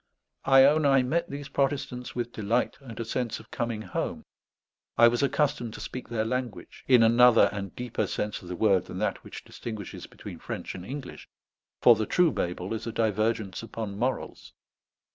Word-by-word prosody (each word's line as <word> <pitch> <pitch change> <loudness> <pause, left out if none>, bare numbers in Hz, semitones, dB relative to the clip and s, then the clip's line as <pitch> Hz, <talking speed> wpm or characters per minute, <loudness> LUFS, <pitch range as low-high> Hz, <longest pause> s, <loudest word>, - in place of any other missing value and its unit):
I 135 0 +7
own 150 +3 +5
I 135 -2 +5
met 160 +7 -1
these 140 0 -6
Protestants 135 -3 -2
with 120 -1 -3
delight 115 +3 0
and 115 -5 -10
a 115 - -3
sense 120 +1 -2
of 110 - -16
coming 115 -2 -3
home. - - -4 0.7
I 120 - +8
was 120 0 +1
accustomed 135 -5 0
to - - -8
speak 125 - -6
their 110 -2 -1
language, 115 -6 -4
in 125 -3 +6
another 115 -2 +6
and 100 -2 -6
deeper 120 -4 -2
sense 105 +2 -3
of 90 - -12
the 90 - -4
word 95 -2 +3
than 90 - -8
that 105 - -2
which - - -9
distinguishes 110 -5 -7
between - - -10
French - - -6
and 90 - -8
English; 135 +7 -8 0.5
for 120 - +9
the 110 0 -2
true 175 -3 +3
Babel 90 +3 -3
is 110 +1 -5
a - - -2
divergence 110 -3 0
upon 110 -3 -6
morals. 125 +5 -3
115 Hz, 180 wpm, -27 LUFS, 105-125 Hz, 0.7 s, for